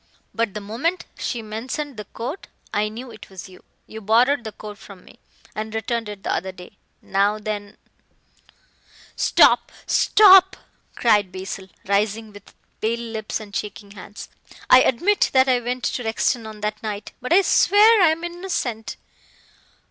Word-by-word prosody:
But 225 -3 -2
the 210 - -4
moment 250 - -2
she 235 -2 -3
mentioned 255 +6 -5
the 210 -1 -8
coat 255 - -7 0.3
I 210 +1 0
knew 240 +3 -9
it - - -13
was 190 -2 -9
you. 185 -1 -16 0.2
You 220 - -10
borrowed 240 +6 +3
the 220 - -5
coat 210 -1 -10
from 195 -3 -14
me, - - -18 0.3
and 220 +1 -5
returned 225 0 -2
it 205 -2 -9
the - - -1
other 190 +2 -3
day. 180 -1 -14 0.2
Now 200 +2 +1
then 210 -1 -6 0.7
" - - -37 0.7
"Stop! - - +4
stop!" 380 -2 +6 0.4
cried 210 -5 +2
Basil, 190 0 -7 0.2
rising 210 +2 -1
with 205 -1 -15 0.3
pale 230 +2 0
lips 220 -1 -4
and 205 -2 -11
shaking 205 -1 -6
hands, 200 +1 -10 0.4
"I 255 - +9
admit 365 - +2
that 260 0 +5
I 255 -1 +3
went 245 +1 -4
to 245 - -2
Rexton 225 +1 -1
on 215 -1 -10
that 210 0 -3
night, 210 -1 -5
but 255 - -6
I 385 +3 +6
swear 420 +3 +5
I 350 - +6
am 320 +2 -2
innocent." 345 - -4
220 Hz, 165 wpm, -22 LUFS, 205-255 Hz, 0.7 s, I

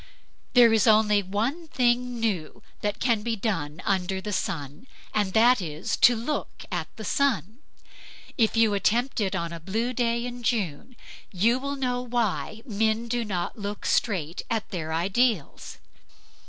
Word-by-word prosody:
There 240 -2 +7
is 220 -1 +3
only 210 -1 +5
one 230 - -2
thing 245 -3 +1
new 200 -9 -2 0.2
that 205 0 -2
can 235 -4 +2
be 230 +1 -1
done 185 -7 -3
under 190 -2 0
the 205 +2 -5
sun; 165 - -4 0.3
and 205 -3 0
that 235 +1 +5
is 165 +6 -3
to 245 - +6
look 240 +7 -4
at - - -2
the - - -7
sun. 230 - 0 0.8
If 225 -2 +2
you 225 -2 +4
attempt 235 +5 +1
it 195 -2 0
on 170 0 -3
a 170 - -6
blue 220 +9 -2
day 235 -1 0
in 245 0 -6
June, 220 - -2 0.4
you 225 +7 +2
will 280 +1 -3
know 250 -2 -1
why 230 -2 -2
men 220 +1 0
do 240 0 -1
not 190 -1 -3
look 205 0 -5
straight 175 -6 0
at 225 -2 -2
their 160 -4 -4
ideals. 190 - 0
220 Hz, 155 wpm, -26 LUFS, 190-240 Hz, 0.8 s, There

